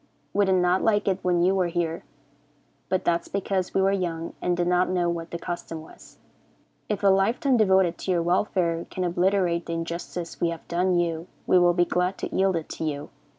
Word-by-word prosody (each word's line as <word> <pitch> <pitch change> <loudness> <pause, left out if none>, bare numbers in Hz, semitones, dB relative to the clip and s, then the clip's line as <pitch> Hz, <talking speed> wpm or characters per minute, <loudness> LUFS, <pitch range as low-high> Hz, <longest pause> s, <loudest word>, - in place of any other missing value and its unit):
We 205 0 +3
did 190 -1 +3
not 180 0 +2
like 205 -2 +2
it 190 -1 +1
when 175 -1 +2
you 185 +2 +4
were 185 -2 +1
here, 170 -1 -2 0.9
but 185 - 0
that 170 0 +2
is - - -16
because 195 -2 -2
we 190 - +3
were 195 - +3
young 170 -4 -2
and 175 -1 0
did 175 - +1
not 180 +1 +2
know 175 -2 +1
what 165 -1 -5
the 170 - -4
custom 170 -2 -6
was. - - -16 0.7
If 210 -1 -2
a 200 - +6
life 195 +5 +3
time 275 -3 +2
devoted 190 -6 +3
to - - -6
your 175 -2 +2
welfare 175 -1 0
can 185 - -3
obliterate 175 -1 +1
the 170 - -3
injustice 170 +1 -5
we 170 - +2
have 165 -1 -7
done 180 +1 +1
you, 170 -1 -1 0.2
we 185 - +5
will 175 0 +4
be 175 0 +3
glad 180 +2 0
to - - -5
yield 190 -1 +2
it 165 -2 -3
to - - -5
you. 150 -1 -3
180 Hz, 220 wpm, -25 LUFS, 170-190 Hz, 0.9 s, a